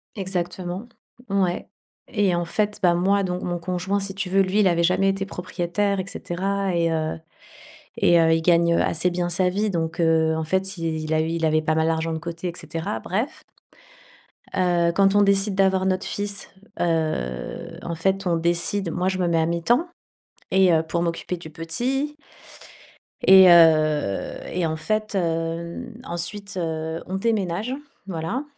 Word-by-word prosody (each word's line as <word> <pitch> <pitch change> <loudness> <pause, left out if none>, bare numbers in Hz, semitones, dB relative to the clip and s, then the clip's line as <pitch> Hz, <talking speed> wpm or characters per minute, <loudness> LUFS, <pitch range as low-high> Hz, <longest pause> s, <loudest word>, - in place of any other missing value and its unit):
Exactement, 185 +1 -3 0.4
ouais 190 -3 0 0.5
et 200 -5 +2
en 175 - 0
fait, 210 +4 -1
bah, 175 -1 +5
moi 195 +3 +2
donc 180 0 -2
mon 175 -1 -2
conjoint 185 +3 -2
si 195 0 -4
tu 195 -1 -3
veux, 195 +1 +4
lui, 195 +2 +1
il 200 - +5
avait 170 -1 +2
jamais 185 +3 +2
été 195 0 0
propriétaire 190 +2 -2
et - - -7
cetera 195 +1 -2
et 170 -1 +1
heu, 160 0 -1 0.8
et 170 -1 +5
heu, 160 0 +4
il 165 - +3
gagne, 170 0 +3
heu, - - +2
assez 170 +2 +1
bien 175 0 -1
sa 180 +1 +2
vie 210 +3 0
donc 165 -3 -2
heu, 160 -1 +3
en 160 - -2
fait 190 +3 -1
il 160 -1 -3
a 155 - +3
il 165 +1 -1
avait 155 0 +3
pas 155 0 0
mal 160 0 +2
d'argent 160 0 -1
de 160 - -3
côté 170 +2 -5
et - - -4
cetera, 165 +6 -4
bref. 220 +9 -3 1.1
Heu, 175 -2 +2
quand 195 0 +4
on 205 - +6
décide 200 0 +2
d'avoir 190 -1 +2
notre 185 0 0
fils, 205 -1 -4 0.3
heu, 155 - -2
en 170 - -4
fait, 190 +3 0
on 170 - +2
décide 170 +2 0
moi, 180 +3 -1
je 190 - 0
me 180 - +1
mets 165 -1 +2
à 160 - +2
mi-temps 200 - +1 0.6
et 190 -2 +4
heu, 160 -1 +3
pour 170 +1 -2
m'occuper 170 +1 -2
du 170 -2 -10
petit. 255 - -2 1.1
Et 190 0 +9
heu 155 - +4
et 175 -1 -1
en 160 - -1
fait 215 +5 -2
heu, - - +3 0.8
n 250 - -14
ensuite, 195 +3 -3
heu, 160 -1 -3
on 185 - -4
déménage, 210 +1 -1 0.3
voilà. 180 - -3
175 Hz, 175 wpm, -23 LUFS, 165-195 Hz, 1.1 s, Et